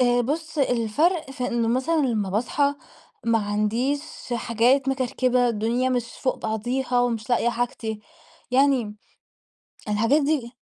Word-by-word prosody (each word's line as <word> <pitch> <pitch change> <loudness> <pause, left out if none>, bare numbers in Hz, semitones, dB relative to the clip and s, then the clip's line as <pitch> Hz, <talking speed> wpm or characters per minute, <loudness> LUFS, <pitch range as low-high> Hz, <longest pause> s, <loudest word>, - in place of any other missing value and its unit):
آآ، 245 -1 +4
بُص 315 +4 -3
الفرْق 270 - +1
في 255 -2 -3
إنه 235 -2 0
مثلًا 265 +7 +1
لما 210 -5 -1
باصحى 280 +7 +1 0.5
ما 230 -1 +3
عنديش 215 +7 0 0.3
حاجات 240 +4 +2
مكركبة، 255 -1 +1
الدنيا 235 +3 0
مش 245 -2 0 0.2
فوق 255 - +1
بعضيها 245 +3 -1
ومش 235 -2 -1
لاقية 240 0 +3
حاجتي، 230 -2 -3 0.5
يعني 255 -5 +2 0.9
الحاجات 230 +8 +2
دي 275 -5 -1
245 Hz, 125 wpm, -24 LUFS, 225-270 Hz, 0.9 s, آآ